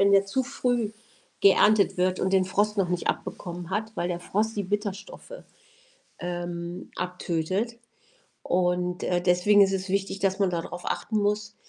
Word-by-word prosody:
wenn 200 0 +5
der 200 0 +5
zu 260 +7 0
früh 245 -4 -1 0.5
geerntet 200 +1 +5
wird 185 0 +1
und 190 +1 0
den 190 -1 +4
Frost 205 +3 0
noch 190 -3 +1
nicht 180 -1 -2
abbekommen 175 0 -4
hat, 220 +2 -2
weil 175 -1 -1
der 175 - -2
Frost 210 +5 -1
die 200 - -1
Bitterstoffe, 205 - -4 0.9
ähm, 175 0 -5
abtötet. 180 +5 -2 0.7
Und, 180 0 0
äh, 175 -1 +1
deswegen 180 +3 +4
ist 195 - +5
es 190 0 -2
wichtig, 195 0 -1
dass 195 0 0
man 195 -2 +3
da 170 -2 -1
drauf 175 +1 -8
achten 220 - -2
muss, 210 +1 -1
190 Hz, 165 wpm, -26 LUFS, 180-205 Hz, 0.9 s, wenn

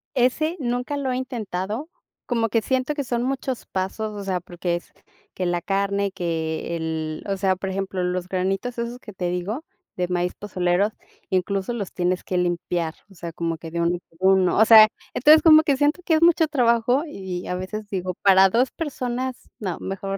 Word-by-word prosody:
Ese 275 +6 +2
nunca 245 +2 -2
lo 270 -2 -1
he - - -1
intentado, 225 - -4 0.4
como 230 -2 0
que 225 +1 +2
siento 260 +5 0
que 285 - -2
son 240 -1 -1
muchos 265 -1 -3
pasos, 210 +3 -3
o - - -5
sea, 185 -2 -1
porque 175 0 -3
es 175 - -8 0.4
que 185 - -3
la 175 0 0
carne, 200 +1 0
que 165 -2 -3
el, 160 -1 -3
o 195 -1 -1
sea, 190 -1 +2
por 190 +1 -5
ejemplo, 190 -1 -2
los 180 0 -2
granitos 195 +6 -2
esos 235 +1 -4
que 210 -4 -11
te 180 -1 -2
digo, 185 - -3 0.3
de 180 -1 -1
maíz 180 0 -1
pozolero, 185 0 0 0.4
incluso 190 +4 0
los 205 -5 -4
tienes 180 0 0
que 185 - -2
limpiar, 175 -2 -1
o 195 - -18
sea, 170 -1 -6
como 165 0 -3
que 165 0 -9
de 170 - -3
uno 170 +1 +2
en 175 - -8 0.2
uno, 190 -1 +4
o 220 - +7
sea, 220 -1 +9 0.3
entonces, 305 +5 +6
como 315 -1 +8
que 280 -3 +2
siento 295 +5 +2
que 335 - +1
es 315 - +2
mucho 335 -1 +5
trabajo 245 -1 +2
y, 190 -9 -6
a 180 - -2
veces, 205 +3 -5
digo: 185 -2 -2
"Para 195 -1 +6
2 245 +6 +2
personas, 255 -5 -4
no, 185 -5 -3
mejor 195 0 -4
195 Hz, 195 wpm, -23 LUFS, 180-245 Hz, 0.4 s, sea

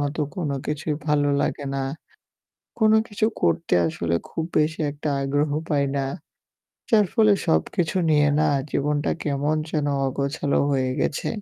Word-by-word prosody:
মতো 145 +2 -2 0.2
কোন 170 -6 -2 0.2
কিছুই 150 +1 -2
ভালো 145 -1 +3
লাগে 145 - -2
না। 135 - -1 1.0
কোন 215 -1 +4
কিছু 215 -1 0 0.2
করতে 170 - +1
আসলে 85 +1 -2
খুব 160 - -3
বেশি 155 +1 0
একটা 145 +1 -5
আগ্রহ 145 +2 0 0.2
পাই 145 -2 +2
না। 135 - 0 0.9
যার 215 -3 +5
ফলে 215 -2 +5
সব 80 0 +3
কিছু 175 +1 0
নিয়ে 150 -1 +4
না 155 - +3 0.2
জীবনটা 145 +1 0
কেমন 145 +1 0
যেন 150 -3 0 0.2
অগোছালো 140 +2 -1
হয়ে 130 -2 +1
গেছে। 140 - -1
150 Hz, 145 wpm, -24 LUFS, 140-160 Hz, 1.0 s, যার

